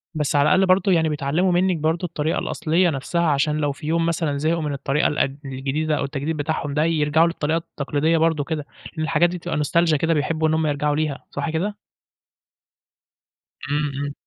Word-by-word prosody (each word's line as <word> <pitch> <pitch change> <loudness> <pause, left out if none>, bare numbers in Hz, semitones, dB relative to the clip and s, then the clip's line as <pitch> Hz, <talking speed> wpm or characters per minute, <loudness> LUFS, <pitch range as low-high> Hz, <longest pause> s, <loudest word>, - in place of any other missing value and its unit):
بس 150 -1 -1
على 140 - +5
الأقل 190 0 +4
برضو 185 +1 +3
يعني 160 -3 +3
بيتعلموا 150 +5 0
منِك 180 0 +2
برضو 160 +3 0
الطريقة 160 -2 -1
الأصلية 170 +3 +1
نَفسها، 160 +4 -2
عشان 150 -1 +1
لو 145 -2 0
في 150 +2 -8
يوم 165 +1 +1
مثلًا 160 -4 -1
زهقوا 160 +3 0
من 150 -2 -2
الطريقة 140 +2 0
الق 150 - 0 0.2
الجديدة 140 +4 -2
أو - - -1
التجديد 145 +3 -3
بتاعهم 145 -1 -2
ده، 150 +1 +2
يرجعوا 160 0 +3
للطريقة 160 -1 -1
التقليدية 155 0 -1
برضو 160 -2 +2
كده، 150 -1 -4 0.3
لأن 155 -2 -3
الحاجات 165 +2 +3
دي 180 - -4
تبقى 170 -1 -4
نوستالجيا 155 +2 +2
كده، 165 +3 +1
بيحبوا 155 +1 0
إن 155 - +1
هُم 160 -1 +1
يرجعوا 145 0 0
ليها، 150 -2 -2
صح 145 +3 -3
كده؟ 185 +6 -2 1.9
إمم، 145 0 0
إمم. 145 - -4
155 Hz, 190 wpm, -22 LUFS, 145-165 Hz, 1.9 s, على